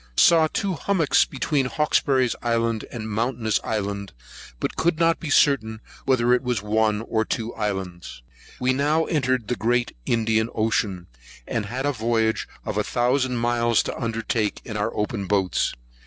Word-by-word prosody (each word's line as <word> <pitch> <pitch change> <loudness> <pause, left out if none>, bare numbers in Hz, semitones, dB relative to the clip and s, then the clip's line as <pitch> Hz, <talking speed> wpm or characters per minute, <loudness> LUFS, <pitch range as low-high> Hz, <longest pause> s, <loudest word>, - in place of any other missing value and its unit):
Saw 165 -2 +6
Two 195 -2 -1
Hummock 170 -1 -1 0.2
between 135 0 0
Hawkesbury's 135 -4 +1
Island 115 -1 0
and 110 -2 -5
Mountainous 110 0 0
Island; 100 -2 -3 0.5
but - - -2
could 170 0 +1
not 165 0 +3
be 165 - -5
certain 110 -7 +3 0.3
whether 125 -2 +3
it 125 - +3
was 125 -4 -2
one 105 0 +1
or 110 -1 0
two 115 +1 -3
islands. 95 - -4 0.4
We 130 +1 +2
now 150 +4 +2
entered 130 -7 0
the 125 - 0
great 120 +1 0
Indian 110 -1 +1
ocean, 105 -5 0 0.4
and 100 - -2
had 130 +5 -3
a 145 - +2
voyage 115 -2 0 0.2
of 105 0 -2
a - - +1
thousand 125 +2 +1
miles 120 -1 +2
to - - -4
undertake 115 -2 -1
in 115 - -6
our 105 +2 -1
open 105 -1 -2
boats. 95 -2 +1
115 Hz, 155 wpm, -24 LUFS, 110-130 Hz, 0.5 s, Saw